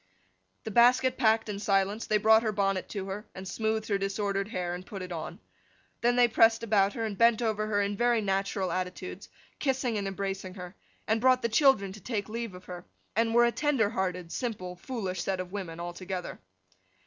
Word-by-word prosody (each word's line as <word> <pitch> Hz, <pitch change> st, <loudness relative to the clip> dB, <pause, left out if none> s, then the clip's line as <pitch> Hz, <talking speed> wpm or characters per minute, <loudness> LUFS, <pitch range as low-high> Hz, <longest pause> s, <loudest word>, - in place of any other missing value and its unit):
The 220 Hz, -, -5 dB
basket 255 Hz, +3 st, +5 dB
packed 225 Hz, -3 st, +2 dB
in 205 Hz, -1 st, -4 dB
silence, 200 Hz, +1 st, +1 dB
they 215 Hz, -, +3 dB
brought 220 Hz, +1 st, +5 dB
her 220 Hz, -2 st, 0 dB
bonnet 195 Hz, -2 st, 0 dB
to 200 Hz, -3 st, -4 dB
her, 195 Hz, +2 st, -6 dB
and 190 Hz, 0 st, -7 dB
smoothed 220 Hz, +1 st, -1 dB
her 200 Hz, -2 st, 0 dB
disordered 195 Hz, 0 st, -1 dB
hair, 180 Hz, -5 st, -3 dB
and 180 Hz, +1 st, -6 dB
put 195 Hz, -1 st, -7 dB
it 180 Hz, -, -8 dB
on. 160 Hz, -2 st, -6 dB, 0.6 s
Then 240 Hz, +1 st, +3 dB
they 245 Hz, -1 st, +6 dB
pressed 225 Hz, 0 st, +4 dB
about 205 Hz, -3 st, +3 dB
her, 230 Hz, -, -2 dB
and 210 Hz, -2 st, -3 dB
bent 230 Hz, +1 st, +4 dB
over 215 Hz, -2 st, -1 dB
her 205 Hz, -1 st, +1 dB
in 200 Hz, +1 st, -2 dB
very 240 Hz, +2 st, +2 dB
natural 195 Hz, -1 st, -1 dB
attitudes, 185 Hz, +1 st, -5 dB, 0.3 s
kissing 260 Hz, -5 st, 0 dB
and 200 Hz, -, -3 dB
embracing 195 Hz, -1 st, -4 dB
her: 180 Hz, -2 st, -8 dB, 0.3 s
and 220 Hz, +1 st, +1 dB
brought 255 Hz, 0 st, +4 dB
the 230 Hz, -, +1 dB
children 235 Hz, -5 st, +4 dB
to 210 Hz, -, -10 dB
take 205 Hz, -1 st, -3 dB
leave 230 Hz, -3 st, -4 dB
of 180 Hz, -, -12 dB
her; 180 Hz, -1 st, -8 dB, 0.3 s
and 225 Hz, +1 st, +1 dB
were 240 Hz, 0 st, +6 dB
a 235 Hz, -, +2 dB
tender 245 Hz, -4 st, +1 dB
hearted, 180 Hz, -4 st, -2 dB
simple, 200 Hz, -8 st, -4 dB
foolish 185 Hz, -3 st, -4 dB
set 190 Hz, 0 st, -2 dB
of 185 Hz, 0 st, -5 dB
women 180 Hz, -5 st, -5 dB
altogether. 180 Hz, +1 st, -5 dB
205 Hz, 200 wpm, -29 LUFS, 190-230 Hz, 0.6 s, they